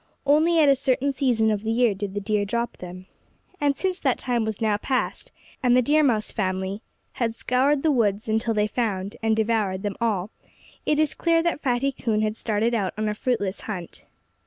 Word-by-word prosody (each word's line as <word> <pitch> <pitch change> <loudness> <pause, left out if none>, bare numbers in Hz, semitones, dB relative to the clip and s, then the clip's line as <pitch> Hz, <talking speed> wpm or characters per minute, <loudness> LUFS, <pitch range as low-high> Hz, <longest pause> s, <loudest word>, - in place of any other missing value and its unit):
Only 310 +4 +4
at 310 -2 +5
a 275 - +6
certain 265 +1 0
season 240 -5 +1
of 210 -1 -1
the 220 - -4
year 230 -1 +3
did 200 0 -5
the - - 0
deer 205 0 0
drop 235 +3 -2
them. 180 +1 -9 0.5
And 285 -3 +1
since 375 +1 -1
that 265 -4 +1
time 240 -3 0
was 220 -2 -4
now 215 -2 +1
past, 255 +4 -2 0.3
and 250 -2 +4
the - - +5
Deer 300 +5 +3
Mouse 230 -7 +1
family 190 0 -2 0.4
had 230 -1 0
scoured 270 +4 +1
the 315 - +3
woods 215 -5 +1
until 220 +1 0
they 210 0 +2
found 205 -3 -2
and 220 -1 +2
devoured 215 -4 0
them 205 -2 -2
all, 210 -3 0 0.6
it 300 0 +2
is 310 -2 +2
clear 330 -1 +2
that 340 -3 -1
Fatty 265 +1 +1
Coon 220 -4 -1
had 215 0 -1
started 225 +1 0
out 200 -5 -1
on 215 0 -1
a - - -1
fruitless 210 -4 -2
hunt. 180 -6 -7
225 Hz, 205 wpm, -24 LUFS, 210-265 Hz, 0.6 s, a